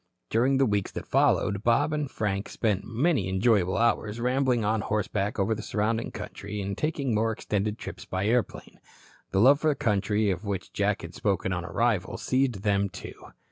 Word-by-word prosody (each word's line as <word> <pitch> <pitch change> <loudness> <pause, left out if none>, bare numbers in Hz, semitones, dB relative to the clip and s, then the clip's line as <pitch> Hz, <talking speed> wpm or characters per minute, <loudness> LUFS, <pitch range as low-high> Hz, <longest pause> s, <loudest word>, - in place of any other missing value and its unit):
During 130 +4 +3
the 135 - +4
weeks 105 -4 0
that - - -5
followed 100 +1 +2
Bob 130 +7 +2
and 150 -2 -1
Frank 100 -4 -2
spent 105 -4 0
many 120 - +1
enjoyable 95 -2 +2
hours 115 -1 +1
rambling 125 -2 +1
on 110 +1 +1
horseback 105 0 -1
over 100 +2 +1
the 110 - -5
surrounding 110 +2 -1
country 105 +1 -7
and 100 0 -3
taking 145 -5 -1
more 110 +1 +1
extended 105 0 -2
trips - - -8
by 95 +1 -2
airplane. 120 +2 -1 0.5
The 95 - 0
love 135 +7 +6
for 155 - 0
the 150 - +1
country 105 -2 +1
of 90 +1 -4
which 100 -3 -4
Jack 100 0 0
had 85 +1 -8
spoken 95 -1 -1
on 85 -1 -3
arrival, 95 +2 0
seized 130 -6 0
them, 100 -1 +2
too. 95 - -8
105 Hz, 180 wpm, -27 LUFS, 100-120 Hz, 0.5 s, love